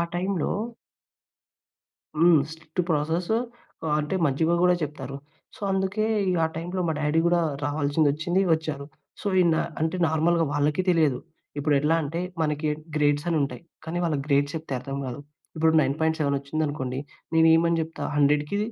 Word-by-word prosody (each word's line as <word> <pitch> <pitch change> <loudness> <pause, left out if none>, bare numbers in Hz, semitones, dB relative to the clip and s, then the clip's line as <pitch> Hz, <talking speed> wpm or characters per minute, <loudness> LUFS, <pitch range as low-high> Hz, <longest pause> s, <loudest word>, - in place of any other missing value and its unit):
టైమ్‌లో 180 -1 -1 1.7
హ్మ్. 165 -2 +6
Strict 160 +2 -5
process 160 +5 0 0.5
ఆహ్, 155 -2 +1
అంటే 150 +5 -3
మంచిగా 160 +5 +1
కూడా 180 0 +5
చెప్తారు. 140 -2 -5 0.4
సో, - - -17
అందుకే 190 +3 0 0.2
ఇగ 180 - +1
ఆ - - +3
టైమ్‌లో 175 +3 -3
మా 160 - +2
డ్యాడీ 150 +2 +2
కూడా 175 0 +3 0.2
రావాల్సింది, 145 +1 +1
వచ్చింది, 175 +5 0
వచ్చారు. 155 -3 -2 0.3
సో, - - -8
ఈనా 170 -3 +3 0.2
అంటే 160 +3 0
నార్మల్‌గా 165 +2 +2
వాళ్ళకి 145 +4 +1
తెలియదు. 155 -7 +3 0.4
ఇప్పుడు 145 0 +1
ఎట్లా 150 +4 +2
అంటే 160 +3 -3 0.2
మనకి 150 0 0 0.3
గ్రేడ్స్ 145 +1 +2
అనుంటాయి. 150 -1 -1 0.2
కానీ 165 +2 -3
వాళ్ళకి 150 -4 0
గ్రేడ్స్ 140 0 +2
అని - - 0
చెప్తే 140 -4 -6
అర్థం 135 +2 -6
కాదు. 125 +2 -5 0.4
ఇప్పుడు 160 0 +3
9.7 150 0 +1
వచ్చిందనుకోండి, 140 -2 -3 0.4
నేను 160 0 +5
ఏమని 170 0 +3
చెప్తా 160 +1 -6
100కి 150 +5 +2
155 Hz, 145 wpm, -25 LUFS, 145-165 Hz, 1.7 s, హ్మ్